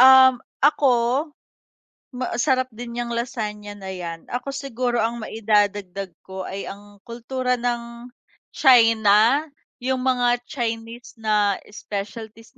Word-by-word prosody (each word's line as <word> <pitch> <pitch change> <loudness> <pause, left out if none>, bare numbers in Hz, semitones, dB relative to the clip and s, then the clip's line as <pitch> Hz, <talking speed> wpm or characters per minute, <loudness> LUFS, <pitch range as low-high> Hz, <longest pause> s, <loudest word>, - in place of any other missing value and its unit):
Um, 260 0 +9 0.3
ako, 290 -1 +4 1.2
ma 255 -1 -4
sarap 260 -2 +2
din 235 +1 -7
niyang 240 0 -2
lasagna 210 -3 -4
na 190 -1 -6
'yan. 170 -2 -6
Ako 250 +3 -3
siguro, 255 -3 -2
ang 235 +1 0
maidadagdag 205 -3 0 0.2
ko 190 0 -6
ay 195 +1 -5
ang 205 +1 -10
kultura 250 +2 -2
ng 240 0 -3 0.4
China. 230 +1 +5 0.3
Yung 260 0 -1
mga 245 -2 +2
Chinese 230 -2 -4
na 210 -2 +2
specialties 215 +4 -7
235 Hz, 115 wpm, -23 LUFS, 210-250 Hz, 1.2 s, Um